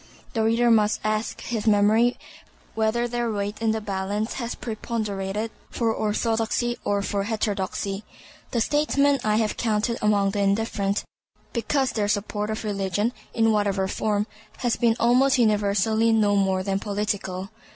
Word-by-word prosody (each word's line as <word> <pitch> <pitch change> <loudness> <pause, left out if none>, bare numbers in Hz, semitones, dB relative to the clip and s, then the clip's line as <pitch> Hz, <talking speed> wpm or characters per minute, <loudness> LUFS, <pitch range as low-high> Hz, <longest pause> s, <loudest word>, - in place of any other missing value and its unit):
The 225 -3 +1
reader 230 +2 +3
must 215 -1 +3
ask 215 +1 -1
his 225 -2 -3
memory 215 +4 +4 0.6
whether 225 +2 +1
their 240 -1 -1
weight 205 +1 -3
in 225 - +2
the 220 0 +1
balance 205 +2 -2
has 235 0 -3
preponderated 215 -2 -3 0.2
for 230 -2 0
orthodoxy 225 +2 0
or 200 0 0
for 200 0 -1
heterodoxy. 200 -2 -2 0.5
The 235 - 0
statesmen 285 +1 +2
I 215 -1 +2
have 220 -1 0
counted 225 +1 0
among 205 -2 +3
the 205 - -2
indifferent, 200 0 0 0.5
because 260 +2 0
their 210 -3 0
support 210 0 -1
of 215 +1 -3
religion, 205 +2 -1 0.2
in 225 -1 +4
whatever 200 -2 +1
form, 210 +1 0 0.3
has 245 -2 0
been 230 -2 +2
almost 255 +3 +4
universally 215 0 +2
no 210 -2 +3
more 190 -1 +1
than 195 0 -1
political. 200 -2 -3
215 Hz, 145 wpm, -25 LUFS, 205-230 Hz, 0.6 s, memory